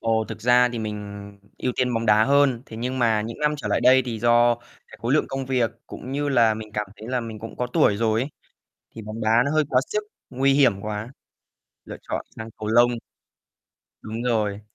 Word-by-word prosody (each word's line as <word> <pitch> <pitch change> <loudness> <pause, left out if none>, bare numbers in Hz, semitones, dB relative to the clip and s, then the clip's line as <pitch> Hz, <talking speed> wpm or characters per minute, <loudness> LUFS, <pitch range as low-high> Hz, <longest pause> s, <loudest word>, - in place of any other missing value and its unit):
Ồ, 110 -1 +1
thực 110 -1 -7
ra 125 +2 +4
thì 120 - -4
mình 100 -2 -7 0.2
ưu 125 - -1
tiên 125 -1 +1
bóng 115 0 -1
đá 105 +1 +5
hơn, 140 -3 +3
thế 110 - -10
nhưng 125 +3 -3
mà 110 -3 +2
những 115 +4 -7
năm 150 0 +2
trở - - -5
lại - - +1
đây 130 +1 +6
thì 115 -3 -4
do 120 0 +4 0.3
cái - - -13
khối 120 +3 0
lượng 155 - +3
công 135 -1 -4
việc 125 -4 +1 0.2
cũng 130 - -8
như 145 +1 -1
là 115 -5 +4
mình 110 -1 -9
cảm 105 0 -2
thấy 110 +3 -10
là 125 -1 0
mình 110 -2 -7
cũng 115 - -9
có 125 - -1
tuổi 105 -4 +2
rồi 110 0 +1
ấy 140 - -5 0.7
thì 110 - -7
bóng 110 +2 -7
đá 110 - 0 0.2
nó 140 - -1
hơi 155 0 +3
quá 125 0 +3
sức, 210 0 -2 0.3
nguy 135 +1 +2
hiểm 125 -9 +3
quá, 105 +2 -5 0.8
lựa - - -8
chọn - - -3
sang 110 0 -7
cầu 110 -1 -5
lông. 120 +2 +5 1.1
Đúng 110 +2 -6
rồi. 105 -4 0
115 Hz, 225 wpm, -24 LUFS, 110-130 Hz, 1.1 s, đây